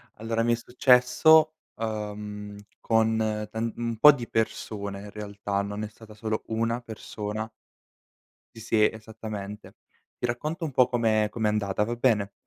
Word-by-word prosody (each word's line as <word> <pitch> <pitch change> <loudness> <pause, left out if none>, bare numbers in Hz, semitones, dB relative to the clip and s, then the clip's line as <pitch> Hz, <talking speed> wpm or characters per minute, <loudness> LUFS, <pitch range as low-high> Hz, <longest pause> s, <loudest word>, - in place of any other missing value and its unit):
Allora, 115 +1 -2
mi 120 0 +3
è - - +3
successo, 125 +6 +5 0.2
uhm, 105 -2 -5 0.2
con 110 0 +2 0.3
tant 115 +1 -3
un 115 -1 -2
po' 150 +7 +10
di 120 -4 -6
persone 100 -3 -2
in 105 0 -10
realtà, 100 -1 -3
non 105 +1 -4
è - - -3
stata 110 0 -15
solo 110 0 -3
1 115 +1 0
persona. 110 -1 -6 1.1
Sì, - - -10
sì 110 -1 +3
esattamente. 110 -2 -8 0.4
Ti - - -2
racconto 150 +8 -3
un 155 - -4
po' 125 -1 +4
com'è 110 -3 +2
com'è 110 -1 -1
andata, 105 -1 0
va 120 +2 -3
bene? 110 -5 +1
110 Hz, 150 wpm, -27 LUFS, 105-120 Hz, 1.1 s, po